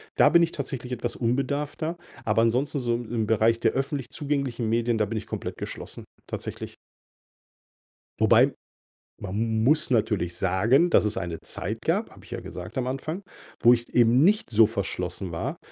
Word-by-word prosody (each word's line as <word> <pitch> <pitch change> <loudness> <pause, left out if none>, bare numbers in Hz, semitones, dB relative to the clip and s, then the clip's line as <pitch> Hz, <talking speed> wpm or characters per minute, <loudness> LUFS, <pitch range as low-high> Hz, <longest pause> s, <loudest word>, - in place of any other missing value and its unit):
Da - - +6
bin 170 - +5
ich 170 -1 +2
tatsächlich 130 -3 -5
etwas 120 0 -3
unbedarfter, 140 +6 -1 0.3
aber 110 0 +2
ansonsten, 125 +6 +1
so 120 -2 0
im 120 -1 -6
im 110 -2 0
Bereich 115 +1 +3
der 115 - +2
öffentlich 135 0 -2
zugänglichen 140 -6 -2
Medien, 115 +1 +1
da 105 - +2
bin 110 +2 -3
ich - - -12
komplett - - -5
geschlossen - - -7 0.2
tatsächlich. - - -6 1.4
Wobei, 120 +5 +5 0.7
man 100 -1 -5
m 110 0 0
muss 155 +4 +3
natürlich 105 -8 +1
sagen, 110 - +3
dass - - +5
es 105 0 -1
eine 85 -3 -4
Zeit - - -4
gab- - - 0
habe - - -16
ich - - -16
ja - - -3
gesagt 90 +7 -8
am 125 -1 -1
Anfang- 155 +8 -4 0.4
wo 120 0 +7
ich 120 0 -3
eben 120 +3 +5
nicht 210 +4 +3
so 110 0 +6
verschlossen 95 -4 -3
war. 80 - -3
120 Hz, 175 wpm, -26 LUFS, 110-135 Hz, 1.4 s, wo